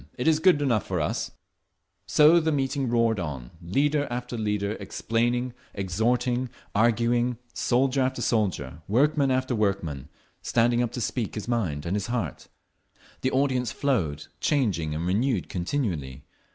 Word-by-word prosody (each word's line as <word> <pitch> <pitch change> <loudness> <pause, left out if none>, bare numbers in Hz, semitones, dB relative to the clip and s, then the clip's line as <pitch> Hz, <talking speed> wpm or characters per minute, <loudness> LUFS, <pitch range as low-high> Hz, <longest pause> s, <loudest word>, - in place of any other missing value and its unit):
It 125 - -1
is 155 -1 +4
good 160 -4 +4
enough 120 -7 +2
for - - -1
us…." - - -1 0.8
So 155 +3 +6
the 160 -1 0
meeting 135 -2 0
roared 115 -2 +2
on, 70 -8 -5
leader 145 - +1
after 125 0 -4
leader 105 -2 -1
explaining, 120 +2 -1 0.2
exhorting, 120 +6 0 0.2
arguing, 120 +2 +2 0.2
soldier 130 +2 +1
after 130 0 0
soldier, 95 - -1
workman 140 +6 +3
after 130 0 +1
workman, 90 - -1 0.3
standing 120 +1 +2
up 120 - -1
to 125 - -3
speak 115 0 -2
his 105 - -5
mind 90 -12 -1
and 85 +4 -1
his 105 - -2
heart…. 115 - -3 0.7
The 130 - +1
audience 130 -3 +1
flowed, 85 - -1
changing 95 - 0
and 80 +2 -2
renewed 105 +2 0
continually. 85 - -2
120 Hz, 140 wpm, -26 LUFS, 95-130 Hz, 0.8 s, So